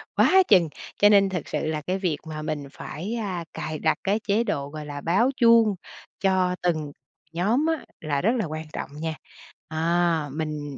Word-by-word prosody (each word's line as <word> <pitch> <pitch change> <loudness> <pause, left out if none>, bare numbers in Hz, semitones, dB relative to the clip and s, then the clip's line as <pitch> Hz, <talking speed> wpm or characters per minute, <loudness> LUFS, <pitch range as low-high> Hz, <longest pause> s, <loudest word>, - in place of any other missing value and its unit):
quá 380 0 +6
chừng. 180 -6 +5 0.3
Cho 205 - +6
nên 200 -1 +5
thật 180 -3 -2
sự - - -2
là 155 -1 -2
cái 185 +1 0
việc 175 -6 0
mà 155 -1 -5
mình 150 -2 -4
phải, 180 +14 -6
a, 195 -7 -3
cài 155 0 -4
đặt 155 - +2
cái 200 +2 +1
chế 210 +3 +3
độ, 140 -11 -2
gọi 155 0 -7
là, 145 -1 -6
báo 195 - +3
chuông 230 -4 +5 0.4
cho 185 -2 +2
từng 155 -4 -1 0.4
nhóm 215 - +1
á 325 -2 -1 0.2
là 145 -3 -1
rất 215 - +3
là 225 - 0
quan 155 0 -5
trọng - - -4
nha. 160 -1 -2 0.5
À, 165 -1 +1
mình 150 -2 -4
170 Hz, 190 wpm, -25 LUFS, 155-205 Hz, 0.5 s, quá